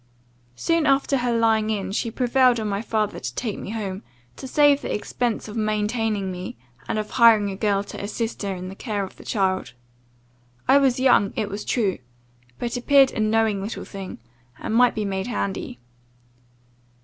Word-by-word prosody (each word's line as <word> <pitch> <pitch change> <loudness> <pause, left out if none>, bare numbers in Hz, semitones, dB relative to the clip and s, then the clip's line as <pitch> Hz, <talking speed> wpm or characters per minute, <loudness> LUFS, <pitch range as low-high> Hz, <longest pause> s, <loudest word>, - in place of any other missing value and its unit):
"Soon 330 - +1
after 275 0 +3
her 245 -1 0
lying 220 -1 +2
in, 200 -3 -2
she 230 +3 -1
prevailed 250 +1 +3
on 215 - -2
my 200 0 -1
father 215 -2 -1
to - - -6
take 220 -5 -3
me - - -7
home, 205 -3 -4 0.3
to 265 - -8
save 290 +1 +4
the - - -4
expense 235 +2 -2
of 210 - -8
maintaining 215 -2 -1
me, 180 -7 -7 0.3
and - - -1
of 215 0 -3
hiring 225 -4 +5
a - - -5
girl 200 -1 +1
to 205 - -8
assist 225 +2 -3
her 200 -2 -2
in 180 0 -6
the 190 - -7
care 205 -1 -3
of 190 - -9
the - - -12
child. 190 - -1 0.9
I 270 +2 +6
was 265 -3 +2
young, 250 -6 +4
it 215 -3 -2
was 200 +1 -5
true, 205 - 0 0.6
but 240 +1 -3
appeared 270 +1 +5
a - - -5
knowing 215 -2 +2
little 205 +4 -5
thing, 195 -2 -8 0.4
and - - -4
might 245 +1 +4
be 215 -2 -1
made 190 +1 -2
handy. 200 - -3
220 Hz, 185 wpm, -23 LUFS, 200-245 Hz, 0.9 s, I